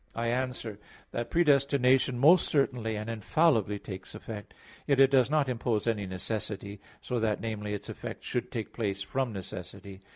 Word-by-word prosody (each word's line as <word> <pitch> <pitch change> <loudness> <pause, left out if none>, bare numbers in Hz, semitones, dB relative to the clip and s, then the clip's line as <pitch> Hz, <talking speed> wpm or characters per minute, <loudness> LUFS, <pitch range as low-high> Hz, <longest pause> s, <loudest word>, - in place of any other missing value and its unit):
I 115 0 -1
answer 120 -4 -2 0.3
that, 120 0 -3
Predestination 140 -5 +3
most 160 +7 +6
certainly 125 -6 +1
and 105 +1 -4
infallibly 115 - +2
takes 95 0 -8
effect; 110 -2 -8 0.4
yet 140 -2 +3
it 135 0 +7
does 130 -2 +4
not 150 -2 +2
impose 120 -3 -1
any 105 -4 0
necessity, 100 +1 -4 0.2
so 125 -2 -1
that, 110 -2 +1
namely, 105 -2 -3
its 100 - -7
effect - - -7
should 125 +1 -3
take 115 -5 -4
place 100 -4 -2
from 130 +3 -1
necessity. 95 0 -8
115 Hz, 160 wpm, -29 LUFS, 105-130 Hz, 0.4 s, it